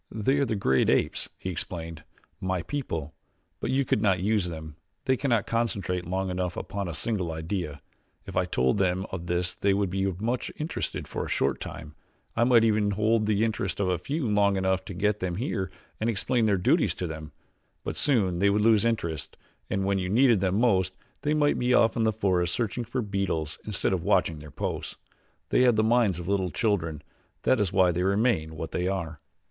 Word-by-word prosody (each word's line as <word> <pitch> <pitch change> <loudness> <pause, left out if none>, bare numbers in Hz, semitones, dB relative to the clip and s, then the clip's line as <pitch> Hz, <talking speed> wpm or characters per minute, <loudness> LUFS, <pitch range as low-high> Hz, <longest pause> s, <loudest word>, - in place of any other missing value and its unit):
"They 130 +6 +1
are 140 - +3
the 110 - -1
great 65 -10 +2
apes," - - +1
he 95 - -4
explained; 85 -2 -5 0.4
"my 95 -2 -1
people; 85 - -4 0.5
but - - -3
you 135 +1 +2
could 105 - +1
not 95 -4 +3
use 105 0 +1
them. 80 -3 -7 0.3
They 130 - +3
cannot 120 -5 +1
concentrate 100 -7 -1
long 95 +1 -1
enough 90 -1 -2
upon 100 -1 -4
a 85 - -5
single 95 -4 -2
idea. 80 -2 -4 0.4
If - - -8
I - - +2
told 65 +10 +1
them 95 0 +1
of 85 -2 -5
this 90 0 0
they 100 -1 +1
would 100 -2 0
be 95 +1 0
much 115 +7 -2
interested 155 +2 -3
for - - -3
a - - -6
short - - 0
time 75 -1 -7 0.4
I 115 - +3
might 120 -2 +5
even 105 -2 +3
hold 110 +2 +2
the 105 0 +2
interest 100 -4 -2
of 95 -2 +1
a 90 -2 0
few 145 - -2
long 100 -2 +3
enough 95 0 +1
to 100 - -7
get 105 +3 +1
them 90 -2 -2
here 100 -3 -2 0.3
and 110 - 0
explain 115 +2 +1
their 100 -2 +3
duties 90 - +2
to 90 - -3
them; 80 -2 -6 0.5
but - - -4
soon 100 -11 +2
they 100 +2 +4
would 105 +1 +2
lose 110 -2 +5
interest 85 -11 -2 0.3
and 95 0 0
when 100 0 +1
you 90 0 -2
needed 120 +1 +5
them 95 0 +1
most 95 -6 +2 0.2
they 150 +1 +1
might 145 -1 +2
be 125 0 +3
off 115 -1 +4
in 115 - +1
the 110 - +3
forest 90 -5 +1
searching 120 +1 -2
for 120 +2 -2
beetles 95 -7 -2
instead 100 -2 0
of 90 - 0
watching 80 -1 +2
their 75 0 -10
posts. 70 - -4 0.5
They - - +3
have 125 -2 +5
the 110 - +3
minds 110 -5 +3
of 85 -1 -6
little 95 -2 +1
children 85 -8 -1 0.4
that 130 - +3
is 100 -4 +1
why 95 -2 +4
they 85 +1 -1
remain 95 -5 +1
what 80 +1 -5
they 90 0 -1
are." 85 -5 -3
95 Hz, 205 wpm, -27 LUFS, 90-110 Hz, 0.5 s, might